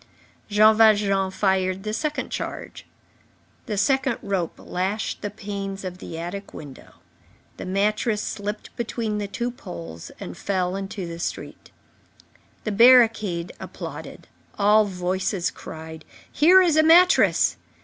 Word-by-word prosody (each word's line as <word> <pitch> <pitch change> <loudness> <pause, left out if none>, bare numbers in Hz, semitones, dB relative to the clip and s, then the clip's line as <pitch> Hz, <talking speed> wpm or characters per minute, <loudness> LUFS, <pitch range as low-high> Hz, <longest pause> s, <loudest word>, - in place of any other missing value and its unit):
Jean 215 +1 +5
Valjean 205 -3 +4
fired 190 -1 0
the 215 0 -3
second 300 +6 -3
charge. - - -6 0.8
The 210 -3 -3
second 265 +4 +1
rope 190 -4 -2
lashed 195 +4 -3
the 205 - -3
panes 200 -2 -6
of 180 -1 -6
the 165 - -8
attic 180 +4 -7
window. 140 -3 -11 0.6
The - - -7
mattress 210 +3 0
slipped 210 0 -5
between 225 -2 -3
the 205 - -3
two 240 +5 -3
poles 85 - -9
and - - -7
fell 185 -2 -1
into 195 -1 -5
the 170 0 -7
street. - - -6 0.9
The 215 - -2
barricade 220 -6 +4
applauded. - - -8 0.3
All 210 +1 +5
voices 185 -1 -2
cried: 160 0 -10 0.3
"Here 365 +5 +6
is 330 -4 +2
a - - +7
mattress!" 345 +3 +5
200 Hz, 130 wpm, -23 LUFS, 185-220 Hz, 0.9 s, a